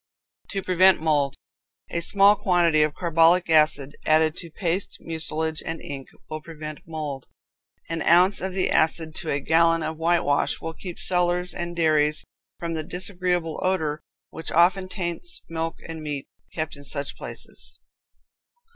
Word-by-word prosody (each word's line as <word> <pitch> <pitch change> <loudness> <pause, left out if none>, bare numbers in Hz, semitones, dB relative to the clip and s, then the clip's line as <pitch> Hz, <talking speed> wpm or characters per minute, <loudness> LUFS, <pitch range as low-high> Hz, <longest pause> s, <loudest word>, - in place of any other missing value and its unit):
To 195 -2 -3
Prevent 185 +1 +5
Mold. 145 -3 +1 0.6
A 170 - -1
small 200 +4 +5
quantity 175 -5 +3
of 150 0 +1
carbolic 170 0 +3
acid 150 -3 +3
added 155 0 +3
to 170 - -7
paste, 175 +2 -2
mucilage 160 -1 -3
and 165 0 -4
ink, 135 -2 -7 0.2
will 155 0 -5
prevent 155 -1 -8
mold. 150 -5 -5 0.6
An 165 -1 -3
ounce 180 +4 +4
of 190 0 -3
the 190 0 0
acid 160 0 +1
to 160 - -5
a 140 - +1
gallon 165 +2 +3
of 160 0 -3
whitewash 165 -3 +1
will 165 - -5
keep 175 +1 -8
cellars 180 0 0
and 175 -1 -4
dairies 155 -2 +3 0.3
from 170 -1 -4
the 160 - -2
disagreeable 180 -1 -2
odor 160 -5 0 0.3
which 160 - -6
often 185 +3 +3
taints 185 - -4
milk 165 0 -3
and 165 -1 -6
meat 145 -3 -4 0.3
kept 155 -2 -3
in 140 - -12
such 140 0 -2
places. - - -8
165 Hz, 150 wpm, -25 LUFS, 155-175 Hz, 0.6 s, Prevent